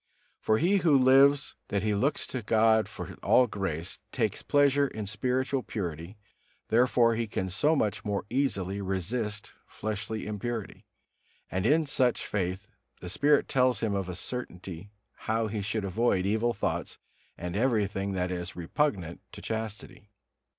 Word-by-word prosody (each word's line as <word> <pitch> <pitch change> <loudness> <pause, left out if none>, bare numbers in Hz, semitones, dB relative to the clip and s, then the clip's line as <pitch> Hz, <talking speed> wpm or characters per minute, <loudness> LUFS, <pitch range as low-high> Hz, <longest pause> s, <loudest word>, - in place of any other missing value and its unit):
For 110 - +2
he 185 - +3
who 160 -7 +4
so 130 - +3
lives 135 +2 +5
that 100 -1 -1
he 105 -1 +1
looks 135 +9 +1
to 130 - -4
God 110 0 +3
for - - -7
all 125 - +5
grace, 95 -7 -4
takes - - -1
pleasure 145 0 +3
in 110 -5 -6
spiritual 130 +6 -1
purity; 90 -3 -5 0.5
therefore 120 0 +4
he 115 0 -1
can 95 -2 -3
so 145 - +2
much 105 -8 0
more 100 -1 -2
easily 100 -7 -1
resist 105 +3 -2
fleshly 110 +1 -4
impurity: 105 +1 -5 0.6
and 95 +4 0
in 155 +3 +4
such 130 -4 +1
faith 95 0 -2 0.3
the 90 - -7
Spirit 145 +9 +3
tells 125 -4 +2
him 110 -3 0
of 95 -2 -2
a 90 - -4
certainty 95 -5 -6 0.4
how 110 +1 +1
he 105 -1 -3
shall 100 +1 -2
avoid 95 -1 +1
evil 110 +4 +1
thoughts 100 - -3 0.4
and 90 0 -5
everything 105 -4 0
that 90 -1 -1
is 90 0 -4
repugnant 90 - -1
to - - -9
chastity. 110 -2 -6
110 Hz, 150 wpm, -29 LUFS, 95-125 Hz, 0.6 s, lives